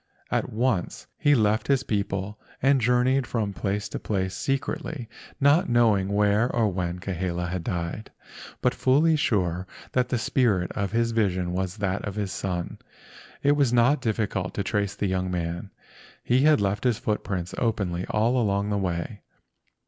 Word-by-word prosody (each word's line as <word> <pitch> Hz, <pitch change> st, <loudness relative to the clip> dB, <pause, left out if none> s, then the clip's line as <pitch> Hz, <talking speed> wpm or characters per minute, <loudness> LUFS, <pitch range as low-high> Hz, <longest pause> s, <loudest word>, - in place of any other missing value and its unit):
At -, -, 0 dB
once 110 Hz, -4 st, -1 dB
he 145 Hz, 0 st, +3 dB
left 110 Hz, -2 st, +2 dB
his 135 Hz, -2 st, +2 dB
people 100 Hz, -1 st, -2 dB, 0.2 s
and 135 Hz, 0 st, +3 dB
journeyed 125 Hz, +2 st, +2 dB
from 105 Hz, -4 st, -2 dB
place 100 Hz, +1 st, -2 dB
to -, -, -5 dB
place 95 Hz, -3 st, -2 dB
secretly, 135 Hz, -1 st, -3 dB, 0.3 s
not 145 Hz, +4 st, +4 dB
knowing 110 Hz, -5 st, +3 dB
where 105 Hz, +3 st, +2 dB
or 115 Hz, -3 st, +2 dB
when 90 Hz, -2 st, -2 dB
Kahele 90 Hz, -1 st, -3 dB
had 90 Hz, -1 st, -3 dB
died, 85 Hz, +5 st, -4 dB, 0.5 s
but -, -, +2 dB
fully 155 Hz, +5 st, +3 dB
sure 95 Hz, -, 0 dB, 0.2 s
that 125 Hz, -1 st, +1 dB
the 125 Hz, -, +1 dB
spirit 110 Hz, -6 st, +1 dB
of 100 Hz, -2 st, -2 dB
his 115 Hz, +1 st, +1 dB
vision 95 Hz, -6 st, 0 dB
was 95 Hz, +2 st, -2 dB
that 100 Hz, -1 st, -1 dB
of 100 Hz, -2 st, -4 dB
his 100 Hz, -3 st, -2 dB
son. 90 Hz, -2 st, -4 dB, 0.6 s
It 145 Hz, -, +5 dB
was 140 Hz, -4 st, +3 dB
not 125 Hz, +5 st, +4 dB
difficult 105 Hz, -4 st, -1 dB
to 100 Hz, -, -1 dB
trace 100 Hz, -1 st, -1 dB
the -, -, -2 dB
young 95 Hz, -1 st, -1 dB
man. 85 Hz, +2 st, -3 dB, 0.5 s
He 125 Hz, +2 st, +3 dB
had 155 Hz, -5 st, +5 dB
left 100 Hz, 0 st, 0 dB
his 125 Hz, -4 st, +2 dB
footprints 95 Hz, -5 st, -3 dB
openly 100 Hz, -6 st, -1 dB
all 115 Hz, +4 st, +2 dB
along 100 Hz, -1 st, 0 dB
the 100 Hz, -, +1 dB
way. 95 Hz, +3 st, -3 dB
105 Hz, 165 wpm, -26 LUFS, 95-120 Hz, 0.6 s, It